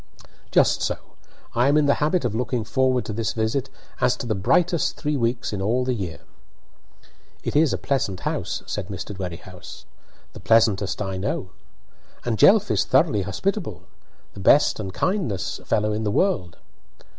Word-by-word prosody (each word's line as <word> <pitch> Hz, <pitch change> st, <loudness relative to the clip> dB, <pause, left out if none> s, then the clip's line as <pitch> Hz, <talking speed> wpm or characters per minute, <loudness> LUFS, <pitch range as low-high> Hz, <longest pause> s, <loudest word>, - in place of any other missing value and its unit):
"Just -, -, +3 dB
so. -, -, -1 dB, 0.6 s
I 120 Hz, +3 st, +3 dB
am 145 Hz, +2 st, +4 dB
in 150 Hz, -, +4 dB
the 140 Hz, -, +4 dB
habit 155 Hz, 0 st, +1 dB
of 115 Hz, -, -1 dB
looking 120 Hz, 0 st, -1 dB
forward 130 Hz, +2 st, +1 dB
to 105 Hz, -, -4 dB
this 110 Hz, 0 st, -2 dB
visit 115 Hz, +4 st, -1 dB, 0.3 s
as 125 Hz, -, +2 dB
to -, -, -5 dB
the 115 Hz, -, 0 dB
brightest 160 Hz, -, +1 dB
three 150 Hz, -1 st, -1 dB
weeks 120 Hz, -3 st, -1 dB
in 100 Hz, -, -3 dB
all 120 Hz, +6 st, +1 dB
the 130 Hz, -, 0 dB
year." 95 Hz, -8 st, -5 dB, 1.2 s
"It -, -, -3 dB
is 150 Hz, -1 st, +4 dB
a -, -, 0 dB
pleasant 115 Hz, -9 st, -1 dB
house," -, -, -3 dB
said 100 Hz, -3 st, -4 dB
Mr. 100 Hz, +1 st, -6 dB
Dwerrihouse. 90 Hz, 0 st, -8 dB, 0.5 s
"The -, -, -10 dB
pleasantest 105 Hz, 0 st, +2 dB
I 95 Hz, -1 st, -4 dB
know." 95 Hz, -1 st, -3 dB, 0.7 s
"And 115 Hz, -3 st, -1 dB
Jelf 205 Hz, 0 st, +6 dB
is -, -, +2 dB
thoroughly 140 Hz, -, +2 dB
hospitable." 100 Hz, -, -3 dB, 0.5 s
"The -, -, -10 dB
best 140 Hz, +8 st, +4 dB
and 95 Hz, -3 st, -4 dB
kindest 155 Hz, -, -2 dB
fellow 105 Hz, 0 st, +1 dB
in 110 Hz, +1 st, -2 dB
the 105 Hz, -, 0 dB
world!" 105 Hz, -, 0 dB
115 Hz, 170 wpm, -23 LUFS, 100-140 Hz, 1.2 s, Jelf